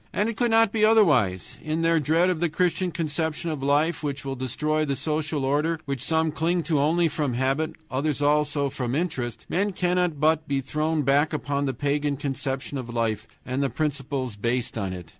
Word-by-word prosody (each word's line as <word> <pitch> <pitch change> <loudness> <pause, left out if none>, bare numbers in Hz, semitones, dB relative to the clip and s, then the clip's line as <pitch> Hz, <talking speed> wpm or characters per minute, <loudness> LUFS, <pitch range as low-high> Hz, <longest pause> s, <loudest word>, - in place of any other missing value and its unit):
And 205 - 0
it 230 - -4
could 240 +1 +1
not 225 -2 +4
be 215 -1 0
otherwise. 150 - +3
In 155 +1 -2
their 165 0 +4
dread 165 +5 +3
of 175 - -2
the 170 0 +1
Christian 180 +3 0
conception 160 0 -2
of 150 -3 -4
life 145 +5 +2
which 140 -2 -4
will 135 -1 -3
destroy 150 +5 -1
the 140 -2 -1
social 155 -1 -2
order, 150 +4 +1
which 140 -4 -3
some 160 -1 +1
cling 170 +3 0
to 155 -4 +1
only 165 +4 +3
from 145 -5 -1
habit, 135 +5 0 0.2
others 140 +2 -1
also 145 -1 +1
from 125 -2 -2
interest, 135 -8 -3
men 200 +3 0
cannot 180 -4 0
but 155 +1 +2
be 140 -1 0
thrown 150 +3 -1
back 145 +4 +3
upon 140 -1 -1
the 135 - -1
pagan 145 +1 0
conception 135 0 -3
of 120 -2 -6
life 115 -2 -1 0.2
and 130 +2 -2
the 140 - +1
principles 135 -5 -2
based 120 +4 -1
on 100 -4 -2
it. 90 -3 -8
150 Hz, 195 wpm, -25 LUFS, 135-160 Hz, 0.2 s, not